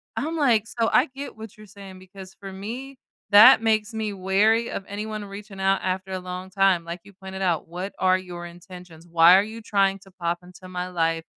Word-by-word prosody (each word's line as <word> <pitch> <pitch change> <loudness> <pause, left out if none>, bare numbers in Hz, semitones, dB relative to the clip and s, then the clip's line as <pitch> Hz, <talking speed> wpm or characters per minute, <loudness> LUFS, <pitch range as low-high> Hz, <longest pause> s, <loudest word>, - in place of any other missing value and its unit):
I'm 320 +3 -3
like 240 -8 +3
so 230 -1 -1
I 250 - +5
get 280 +1 -7
what 220 -2 -10
you're 215 - -13
saying 195 -1 -12
because, 190 0 -13
for 195 -1 -8
me, 240 +8 -7 0.3
that 220 +4 +9
makes 220 0 +1
me 220 -1 -3
wary 205 +5 +2
of - - -5
anyone 210 +1 -5
reaching 200 0 -10
out 195 0 +2
after 185 +1 -3
a 185 - -3
long 180 +1 -7
time. 190 -2 +2
Like 170 +1 -7
you 200 - -16
pointed 190 0 -9
out, 175 -4 0
"What 180 +4 -6
are 185 0 +3
your 175 -2 -8
intentions? 175 -1 -13
Why 170 +2 +7
are 195 - +3
you 220 +2 -8
trying 195 -2 +1
to 195 0 -19
pop 175 -2 -3
into 180 +1 -14
my 180 0 -4
life 165 -2 0
195 Hz, 210 wpm, -24 LUFS, 180-215 Hz, 0.3 s, that